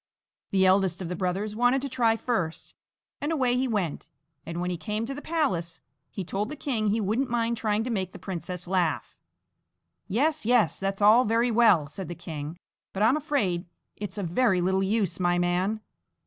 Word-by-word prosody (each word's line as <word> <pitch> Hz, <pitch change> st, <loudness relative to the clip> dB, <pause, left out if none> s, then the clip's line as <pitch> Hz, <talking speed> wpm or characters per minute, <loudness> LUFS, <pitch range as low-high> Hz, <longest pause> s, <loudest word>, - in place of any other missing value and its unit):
The 190 Hz, -1 st, +3 dB
eldest 185 Hz, -2 st, +3 dB
of 170 Hz, -, -5 dB
the 180 Hz, -, -2 dB
brothers 195 Hz, +4 st, -2 dB
wanted 245 Hz, +3 st, +3 dB
to -, -, -1 dB
try 235 Hz, -4 st, +2 dB
first, 200 Hz, -9 st, -2 dB, 0.5 s
and 295 Hz, -, -1 dB
away 255 Hz, -6 st, +2 dB
he 260 Hz, +1 st, +1 dB
went; 190 Hz, -, -2 dB, 0.4 s
and 170 Hz, +1 st, -4 dB
when 180 Hz, +1 st, -1 dB
he -, -, -1 dB
came 210 Hz, +7 st, -3 dB
to 270 Hz, -, -4 dB
the 290 Hz, -, -7 dB
palace, 220 Hz, -, -1 dB, 0.3 s
he 195 Hz, -, -5 dB
told 200 Hz, +5 st, -3 dB
the 300 Hz, -, -5 dB
king 245 Hz, -7 st, -1 dB
he 210 Hz, +2 st, +2 dB
wouldn't 225 Hz, +6 st, 0 dB
mind 235 Hz, 0 st, 0 dB
trying 215 Hz, -1 st, 0 dB
to 250 Hz, -, -3 dB
make 190 Hz, -4 st, -1 dB
the -, -, -10 dB
princess 180 Hz, -1 st, -5 dB
laugh. 175 Hz, -4 st, 0 dB, 0.9 s
"Yes, 290 Hz, +10 st, +1 dB
yes! 225 Hz, -8 st, +3 dB
that's 195 Hz, +1 st, -2 dB
all 220 Hz, +4 st, +7 dB
very 230 Hz, +1 st, +2 dB
well," 220 Hz, -9 st, +5 dB
said 185 Hz, +6 st, -7 dB
the 175 Hz, -, -6 dB
king; 160 Hz, -2 st, -6 dB, 0.4 s
"but 195 Hz, -, 0 dB
I 220 Hz, -, +6 dB
am 265 Hz, -, +3 dB
afraid 220 Hz, -, -1 dB, 0.3 s
it's 205 Hz, +1 st, -6 dB
of 200 Hz, -, -2 dB
very 190 Hz, +1 st, +2 dB
little 190 Hz, +2 st, +1 dB
use, 200 Hz, -1 st, 0 dB
my 175 Hz, -1 st, +2 dB
man. 180 Hz, +5 st, 0 dB
205 Hz, 195 wpm, -27 LUFS, 180-235 Hz, 0.9 s, all